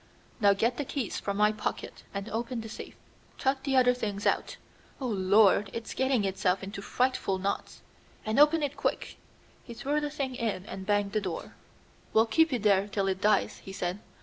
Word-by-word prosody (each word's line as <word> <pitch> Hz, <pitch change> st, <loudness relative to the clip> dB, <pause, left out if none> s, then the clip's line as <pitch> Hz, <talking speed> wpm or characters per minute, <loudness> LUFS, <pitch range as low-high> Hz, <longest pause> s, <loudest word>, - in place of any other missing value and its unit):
"Now 200 Hz, -3 st, +5 dB
get 230 Hz, +5 st, 0 dB
the -, -, -1 dB
keys 265 Hz, -5 st, -3 dB
from 200 Hz, 0 st, -3 dB
my 210 Hz, 0 st, +4 dB
pocket 215 Hz, -1 st, -4 dB
and 200 Hz, +1 st, -5 dB
open 230 Hz, +1 st, -3 dB
the 225 Hz, -, -8 dB
safe. 215 Hz, -, -9 dB, 0.4 s
Chuck 265 Hz, 0 st, 0 dB
the 270 Hz, -1 st, +1 dB
other 250 Hz, -1 st, +5 dB
things 205 Hz, -5 st, -4 dB
out. -, -, 0 dB, 0.4 s
Oh, 270 Hz, -, -4 dB
Lord, 200 Hz, -1 st, +4 dB
it's 230 Hz, -1 st, -5 dB
getting 260 Hz, -5 st, +1 dB
itself 190 Hz, -1 st, 0 dB
into 200 Hz, +1 st, -6 dB
frightful 250 Hz, -4 st, 0 dB
knots! 195 Hz, +2 st, -4 dB, 0.4 s
and 220 Hz, +4 st, +1 dB
open 300 Hz, +1 st, +5 dB
it 285 Hz, 0 st, -2 dB
quick!" 280 Hz, -, -2 dB, 0.5 s
He 235 Hz, -, -10 dB
threw 290 Hz, +5 st, -1 dB
the 295 Hz, -, -2 dB
thing 275 Hz, -3 st, -3 dB
in 220 Hz, -6 st, -2 dB
and 190 Hz, -2 st, -7 dB
banged 205 Hz, -1 st, +1 dB
the 215 Hz, 0 st, 0 dB
door. 180 Hz, -5 st, -5 dB, 0.6 s
"We'll 220 Hz, +1 st, +5 dB
keep 320 Hz, +7 st, +3 dB
it 245 Hz, -5 st, -1 dB
there 200 Hz, -1 st, +4 dB
till 200 Hz, -1 st, -1 dB
it 190 Hz, 0 st, -2 dB
dies," 210 Hz, -1 st, +2 dB
he 195 Hz, -, -10 dB
said. 180 Hz, +1 st, -3 dB
215 Hz, 195 wpm, -29 LUFS, 200-255 Hz, 0.6 s, Now